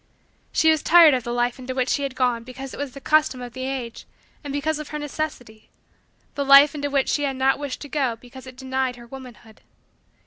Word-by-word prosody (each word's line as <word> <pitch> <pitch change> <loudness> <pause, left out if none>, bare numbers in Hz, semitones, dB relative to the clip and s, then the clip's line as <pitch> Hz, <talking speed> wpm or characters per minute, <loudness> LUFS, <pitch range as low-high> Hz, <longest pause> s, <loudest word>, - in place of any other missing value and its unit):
She 320 - +4
was 315 -2 +1
tired 330 -3 +7
of 250 -2 -1
the 240 - -5
life 240 +1 -1
into 255 0 -6
which 255 0 0
she - - 0
had 275 -2 -4
gone 245 -3 0
because 260 +2 -9
it - - -8
was 285 -3 -4
the 275 - -9
custom 305 -2 +2
of 245 -1 -8
the 260 0 -5
age 250 -4 -6 0.4
and 285 - -6
because 300 +2 -1
of 305 - -7
her 300 - -5
necessity 290 -7 -6 0.6
the 285 - -2
life 275 +1 +7
into 285 -1 -3
which 275 -1 +1
she 290 - 0
had 275 -2 -1
not 265 +1 +1
wished 285 -3 -5
to 290 - -7
go 270 -5 -1
because 255 +3 -14
it 255 - -11
denied 260 -1 -2
her 240 -1 -13
womanhood. 235 -4 -13
265 Hz, 230 wpm, -23 LUFS, 250-285 Hz, 0.6 s, tired